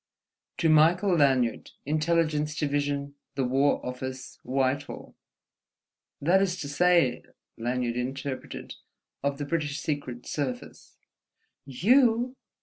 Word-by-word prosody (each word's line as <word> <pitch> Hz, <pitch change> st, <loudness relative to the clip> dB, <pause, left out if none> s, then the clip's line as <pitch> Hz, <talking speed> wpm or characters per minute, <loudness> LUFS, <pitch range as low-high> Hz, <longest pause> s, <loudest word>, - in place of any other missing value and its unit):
"'To 165 Hz, -, +2 dB
Michael 170 Hz, +5 st, +5 dB
Lanyard, 130 Hz, -6 st, +2 dB, 0.2 s
Intelligence 155 Hz, 0 st, +1 dB
Division, 145 Hz, -1 st, -1 dB, 0.2 s
the 135 Hz, -, 0 dB
War 135 Hz, +3 st, +2 dB
Office, 130 Hz, +1 st, -6 dB
Whitehall—'" 135 Hz, +2 st, -2 dB, 1.1 s
"That 180 Hz, +6 st, +3 dB
is 180 Hz, -2 st, 0 dB
to 145 Hz, -, -4 dB
say," 170 Hz, -2 st, +3 dB, 0.3 s
Lanyard 120 Hz, 0 st, -2 dB
interpreted, 130 Hz, +2 st, -5 dB, 0.5 s
"of 140 Hz, 0 st, -1 dB
the 145 Hz, -, -4 dB
British 150 Hz, -1 st, -2 dB
Secret 130 Hz, -5 st, -4 dB
Service." 130 Hz, -4 st, -5 dB, 0.7 s
"You!" 235 Hz, -, +3 dB
145 Hz, 100 wpm, -27 LUFS, 130-165 Hz, 1.1 s, Michael